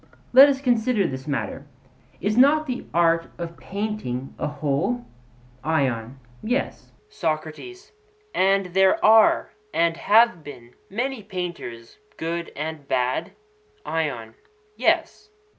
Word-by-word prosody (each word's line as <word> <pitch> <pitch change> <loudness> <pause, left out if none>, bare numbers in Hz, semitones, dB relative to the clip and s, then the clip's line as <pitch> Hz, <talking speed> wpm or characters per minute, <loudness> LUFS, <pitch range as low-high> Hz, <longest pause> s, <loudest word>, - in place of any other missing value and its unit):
Let 270 +3 +10
us 270 -1 -1
consider 235 -5 +2
this 130 -2 -5
matter; 145 0 -3 0.5
is 205 +3 0
not 290 +5 +5
the 250 -3 -5
art 165 -1 +2
of 170 -1 -6
painting 195 - -4
a - - -1
whole? 150 - -1 0.6
ION: 130 -5 -1 0.2
Yes. 245 +4 -3 0.2
SOCRATES: 160 - -5 0.4
And 195 +1 +3
there 190 0 +4
are 220 0 +5 0.2
and 165 0 +1
have 210 -2 +4
been 120 -5 -11 0.2
many 245 +4 -3
painters 170 - -7 0.2
good 170 +1 -4
and 155 -1 -5
bad? 130 +6 -1 0.5
ION: 135 -9 -3 0.4
Yes. 420 - 0
170 Hz, 110 wpm, -24 LUFS, 145-225 Hz, 0.6 s, Let